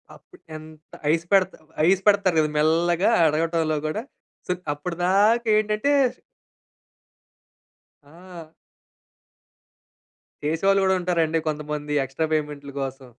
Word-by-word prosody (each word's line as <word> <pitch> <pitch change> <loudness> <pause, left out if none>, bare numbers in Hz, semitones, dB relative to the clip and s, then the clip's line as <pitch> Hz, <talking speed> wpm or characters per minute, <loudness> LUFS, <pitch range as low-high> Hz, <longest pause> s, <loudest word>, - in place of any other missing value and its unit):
అప్పుడెంత 155 - -14 0.2
ice 165 +1 0
పెడుతా 190 -1 +3 0.3
ice 190 0 +3
పెడతారు 200 -4 +3
కదా! 155 -1 +1
మెల్లగా 170 +5 +2 0.2
అడగటంలో 160 0 0
గూడా. 215 +9 -3 0.4
సో, - - -1 0.2
అప్పటిదాకేంటంటే 210 - +1 2.1
ఆ! 170 +1 -13 1.9
చేసేవాళ్ళు 195 +6 +2
కూడా 190 0 +3
ఉంటారండి 165 -2 0
కొంతమంది. 150 0 -4
ఎక్స్‌ట్రా 145 +5 -3
పేమెంట్‌లు 145 -2 -5
కోసం. 135 -1 -6
165 Hz, 85 wpm, -23 LUFS, 155-190 Hz, 2.1 s, పెడుతా